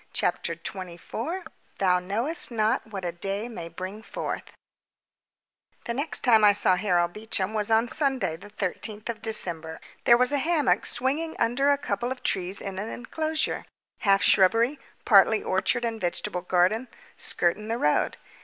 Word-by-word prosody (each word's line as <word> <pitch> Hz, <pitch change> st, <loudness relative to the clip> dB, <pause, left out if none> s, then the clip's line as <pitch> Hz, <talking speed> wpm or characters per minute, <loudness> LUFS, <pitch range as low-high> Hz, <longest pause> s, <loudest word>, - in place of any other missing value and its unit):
CHAPTER -, -, 0 dB
TWENTY 185 Hz, -3 st, -6 dB
FOUR 325 Hz, -, -5 dB, 0.3 s
Thou 180 Hz, -2 st, +3 dB
Knowest 225 Hz, -, -3 dB
Not 220 Hz, -2 st, 0 dB
What 195 Hz, -4 st, -6 dB
a 175 Hz, -, -1 dB
Day 195 Hz, +5 st, -4 dB
May 170 Hz, -8 st, -7 dB
Bring 185 Hz, +5 st, -7 dB
Forth -, -, -5 dB, 1.3 s
The 235 Hz, -, -2 dB
next 285 Hz, +5 st, -1 dB
time 225 Hz, -4 st, +5 dB
I 205 Hz, -1 st, +7 dB
saw 185 Hz, -2 st, +5 dB
Harold 175 Hz, -2 st, +1 dB
Beecham 210 Hz, -2 st, -2 dB
was 210 Hz, -1 st, -1 dB
on 225 Hz, +2 st, +3 dB
Sunday 260 Hz, -, 0 dB
the 200 Hz, +5 st, -12 dB
13th 210 Hz, +2 st, -4 dB
of 225 Hz, -2 st, -4 dB
December. 165 Hz, -7 st, 0 dB, 0.3 s
There 235 Hz, -, +7 dB
was 250 Hz, +2 st, +2 dB
a 290 Hz, -, +1 dB
hammock 310 Hz, -1 st, +2 dB
swinging 290 Hz, +6 st, -1 dB
under 260 Hz, +5 st, +2 dB
a 285 Hz, -, +4 dB
couple 240 Hz, -3 st, -2 dB
of 260 Hz, -, -6 dB
trees 190 Hz, +1 st, -1 dB
in 195 Hz, -1 st, -5 dB
an 210 Hz, +3 st, -4 dB
enclosure, 310 Hz, +6 st, -2 dB, 0.4 s
half 195 Hz, -2 st, +3 dB
shrubbery, 230 Hz, +8 st, +4 dB, 0.3 s
partly 210 Hz, 0 st, +5 dB
orchard 235 Hz, +6 st, 0 dB
and 225 Hz, -1 st, -3 dB
vegetable 180 Hz, +1 st, -2 dB
garden, 185 Hz, +7 st, +2 dB, 0.3 s
skirting 185 Hz, +5 st, 0 dB
the 230 Hz, +1 st, -1 dB
road. 150 Hz, -9 st, +1 dB
215 Hz, 160 wpm, -26 LUFS, 185-245 Hz, 1.3 s, I